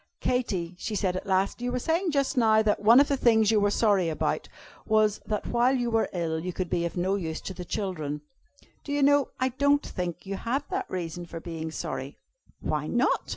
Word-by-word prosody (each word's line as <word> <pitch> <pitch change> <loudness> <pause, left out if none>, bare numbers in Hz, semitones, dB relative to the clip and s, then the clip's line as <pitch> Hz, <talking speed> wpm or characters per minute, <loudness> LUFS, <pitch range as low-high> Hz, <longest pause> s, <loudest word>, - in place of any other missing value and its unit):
"Katy," 195 -9 -1
she 215 - -3
said 185 -2 0
at 185 - -5
last, 190 +4 +1
"you 245 0 -1
were 250 - -1
saying 330 +8 0
just 280 -2 0
now, 220 -3 +4
that 210 -1 +2
one 230 +5 +7
of 285 - +5
the 280 - +1
things 225 -4 +4
you 215 - +4
were 205 0 +3
sorry 200 -5 +2
about 155 - -2 0.4
was 215 -1 +3
that 210 -1 -2
while 245 +2 +2
you 240 -2 -1
were 225 -1 +1
ill 165 -3 -2
you 180 +3 -4
could 180 0 -4
be 170 - +1
of 170 - -4
no 185 +2 +1
use 165 -5 -3
to 190 - -6
the 180 - -7
children. 155 -6 -3 0.6
Do 285 - -4
you 290 -1 +2
know, 285 0 +4
I 260 0 +2
don't 285 +3 +2
think 180 -1 -5
you 195 0 -4
have 265 +7 -2
that 385 0 -3
reason 175 -1 -4
for 165 - -7
being 165 -1 -5
sorry." 160 - -5 0.4
"Why - - -2
not?" - - +1
210 Hz, 220 wpm, -27 LUFS, 180-250 Hz, 0.6 s, one